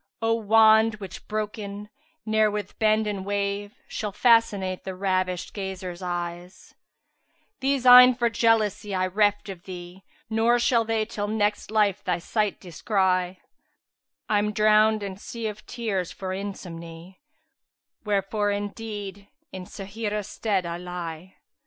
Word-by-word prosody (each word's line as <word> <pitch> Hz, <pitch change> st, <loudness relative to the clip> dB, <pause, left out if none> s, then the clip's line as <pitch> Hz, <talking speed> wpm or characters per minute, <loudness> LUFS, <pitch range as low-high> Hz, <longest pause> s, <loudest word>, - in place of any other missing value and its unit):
O 225 Hz, 0 st, +1 dB
wand, 220 Hz, 0 st, +5 dB
which 195 Hz, -3 st, -10 dB
broken, 210 Hz, -1 st, -5 dB, 0.3 s
ne'er 220 Hz, -1 st, +3 dB
with 205 Hz, -1 st, -5 dB
bend 215 Hz, 0 st, +3 dB
and 205 Hz, -2 st, -3 dB
wave 200 Hz, +2 st, -2 dB
* -, -, -38 dB
Shall 210 Hz, -2 st, -4 dB
fascinate 205 Hz, -5 st, +2 dB
the 190 Hz, -, -5 dB
ravisht 185 Hz, -1 st, -1 dB
gazer's 190 Hz, -3 st, -6 dB
eye; 175 Hz, 0 st, -4 dB, 1.1 s
These 270 Hz, -1 st, 0 dB
eyne 250 Hz, 0 st, +9 dB
for 240 Hz, -1 st, +1 dB
jealousy 215 Hz, -3 st, +1 dB
I 185 Hz, 0 st, +1 dB
'reft 205 Hz, +2 st, +1 dB
of 185 Hz, -3 st, -9 dB
thee, 180 Hz, 0 st, -9 dB
* -, -, -33 dB
Nor 225 Hz, +2 st, +3 dB
shall 235 Hz, -1 st, +2 dB
they 220 Hz, -1 st, 0 dB
till 205 Hz, -2 st, -4 dB
next 210 Hz, -1 st, -1 dB
life 210 Hz, -2 st, +1 dB
thy 180 Hz, -2 st, 0 dB
sight 210 Hz, +4 st, -1 dB
descry: 185 Hz, 0 st, 0 dB, 0.9 s
I'm 210 Hz, 0 st, +1 dB
drowned 215 Hz, 0 st, +4 dB
in 195 Hz, -1 st, -5 dB
sea 230 Hz, +2 st, -7 dB
of 215 Hz, -1 st, -6 dB
tears 200 Hz, -7 st, -3 dB
for 190 Hz, -, -6 dB
insomny 175 Hz, -2 st, -8 dB, 0.4 s
* -, -, -56 dB
Wherefore, 205 Hz, 0 st, 0 dB
indeed 205 Hz, -1 st, -5 dB, 0.2 s
in 185 Hz, -1 st, -7 dB
Sáhirah 205 Hz, +2 st, -5 dB
stead[FN#374] 200 Hz, -3 st, -1 dB
I 170 Hz, 0 st, -4 dB
lie." 180 Hz, 0 st, -7 dB
205 Hz, 140 wpm, -25 LUFS, 185-220 Hz, 1.1 s, eyne